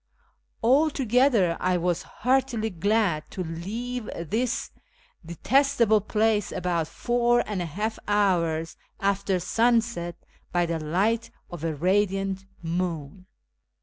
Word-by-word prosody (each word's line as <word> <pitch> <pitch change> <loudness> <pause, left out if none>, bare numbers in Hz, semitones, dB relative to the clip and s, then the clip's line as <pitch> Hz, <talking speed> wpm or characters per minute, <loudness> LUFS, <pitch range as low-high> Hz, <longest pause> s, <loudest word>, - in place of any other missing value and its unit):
Altogether 250 - +3
I 180 0 +1
was 175 0 0
heartily 245 -3 0
glad 195 -3 0
to 185 - -4
leave 215 +9 -5
this 220 +9 -2 0.5
detestable 230 - +2
place 215 -1 +1
about 175 -3 -1
four 240 +3 +1
and 205 -4 -3
a 175 - -3
half 210 +8 -3
hours 170 -6 +1 0.2
after 195 -1 0
sunset, 225 -3 +1 0.4
by 175 -1 +2
the 165 -1 -2
light 205 +9 0 0.2
of 175 -3 -7
a 160 -2 -1
radiant 195 +3 0 0.2
moon. 170 0 -3
195 Hz, 110 wpm, -26 LUFS, 170-230 Hz, 0.5 s, Altogether